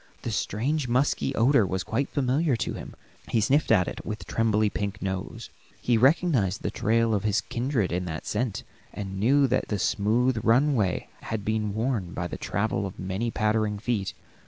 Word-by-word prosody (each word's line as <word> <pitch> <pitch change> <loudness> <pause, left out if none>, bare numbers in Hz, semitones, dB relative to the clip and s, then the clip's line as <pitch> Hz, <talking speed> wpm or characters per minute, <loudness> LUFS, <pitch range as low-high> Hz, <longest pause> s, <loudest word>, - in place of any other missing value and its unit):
The 115 - -2
strange, 125 +8 -1
musky 130 +2 +1
odor 120 0 +4
was 95 -1 -2
quite 135 +5 -1
familiar 140 +2 +1
to 115 - -2
him; - - -8 0.3
he 115 - +1
sniffed 135 +7 +2
at 95 -5 +4
it - - -6
with 105 0 -5
trembly 110 -1 +2
pink 100 -1 -3
nose. 95 -1 -5 0.3
He 120 - +2
recognized 125 - +2
the - - -1
trail 115 +1 +1
of 100 - 0
his 105 +1 +2
kindred 120 -5 -1
in 90 +1 -1
that 80 -3 -5
scent, 110 0 -2 0.3
and 95 -2 -5
knew 135 +7 +4
that 130 0 0
the 105 - -1
smooth 110 +6 +1
runway 115 -4 +2
had 105 -3 -4
been 105 -2 -1
worn 110 -6 -1
by 85 - -3
the 85 - -5
travel 100 0 -1
of 95 - -10
many 95 +5 -2
pattering 110 -2 0
feet. 105 -3 -2
110 Hz, 180 wpm, -26 LUFS, 100-125 Hz, 0.3 s, odor